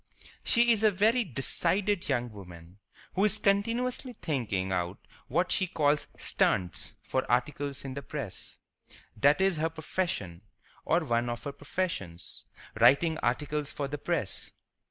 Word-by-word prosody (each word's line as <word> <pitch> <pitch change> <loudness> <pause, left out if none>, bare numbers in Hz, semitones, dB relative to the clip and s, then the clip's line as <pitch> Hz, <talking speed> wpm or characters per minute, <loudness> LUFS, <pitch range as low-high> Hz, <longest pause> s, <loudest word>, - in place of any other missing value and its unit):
She 235 0 +5
is 220 -2 +3
a 220 - +6
very 220 +5 +3
decided 180 - 0
young 120 -3 0
woman, 90 -2 -12 0.3
who 195 - +1
is 210 0 +4
continually 230 +5 0
thinking 105 - -1
out 90 -1 -1 0.3
what - - +1
she 185 - +2
calls 150 -3 +1
"stunts" 90 -2 +1
for 130 - -1
articles 140 +3 -1
in 135 - -4
the 140 - -5
press. - - -6 0.6
That 145 - +4
is 190 -3 +3
her 160 +1 +1
profession, 160 - -3 0.4
or 165 +2 +3
one 120 -2 +1
of 120 0 -4
her 140 - -3
professions—writing 145 - 0
articles 150 +4 -1
for 140 - -3
the 145 +1 -5
press. 145 - -2
145 Hz, 135 wpm, -29 LUFS, 120-185 Hz, 0.6 s, a